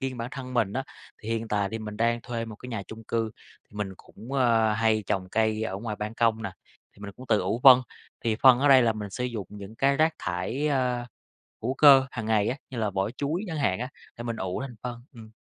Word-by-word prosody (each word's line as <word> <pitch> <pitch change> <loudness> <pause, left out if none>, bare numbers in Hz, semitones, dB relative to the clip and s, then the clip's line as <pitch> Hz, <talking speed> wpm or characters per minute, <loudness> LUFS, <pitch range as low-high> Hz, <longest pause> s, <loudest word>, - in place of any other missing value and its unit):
riêng 130 -1 -3
bản 115 +1 -4
thân 130 -2 -7
mình 110 -4 +1
á, 135 - -1 0.4
thì 110 - -7
hiện 115 0 -2
tại 100 -1 0
thì 115 - -3
mình 105 -1 -7
đang 115 +1 +1
thuê 115 -1 -4
một 110 -2 -9
cái 125 - -10
nhà 110 -5 -4
chung 110 0 -10
cư, 115 -1 -1 0.3
thì 105 - -17
mình 100 -2 -3
cũng, 115 +6 -13
ờ, 115 -5 +3
hay 110 -1 +2
trồng 95 -1 -1
cây 110 +1 +1
ở 95 -4 -2
ngoài 105 0 -5
ban 105 +1 -5
công 115 -1 +1
nè, 100 - -3 0.4
thì - - -21
mình 100 -1 -6
cũng 130 - -11
tự 110 -2 +3
ủ 100 +6 -1
phân, 130 -2 +9 0.4
thì 110 -2 +1
phân 130 0 +7
ở 145 +1 +3
đây 130 -2 +8
là 115 -1 +3
mình 105 -2 -6
sử 125 +5 -3
dụng 115 -6 -4
những 105 +1 -9
cái 140 +2 +2
rác 155 +1 +3
thải, 90 +12 -2
ờ, 125 -3 0 0.6
hữu 130 +4 -1
cơ 135 -2 +7
hàng 115 -3 -5
ngày 110 -2 +2
á, 130 - -1
như 125 - -5
là 110 -2 0
vỏ 95 +2 -1
chuối 145 - -2
chẳng 165 -4 -4
hạn 95 -10 +1
á, 125 +2 -3 0.3
thì 120 - -7
mình 115 -1 -3
ủ 95 +1 -3
thành 125 -4 -7
phân, 120 -1 -6
ừm. 110 -2 -12
115 Hz, 255 wpm, -27 LUFS, 105-125 Hz, 0.6 s, phân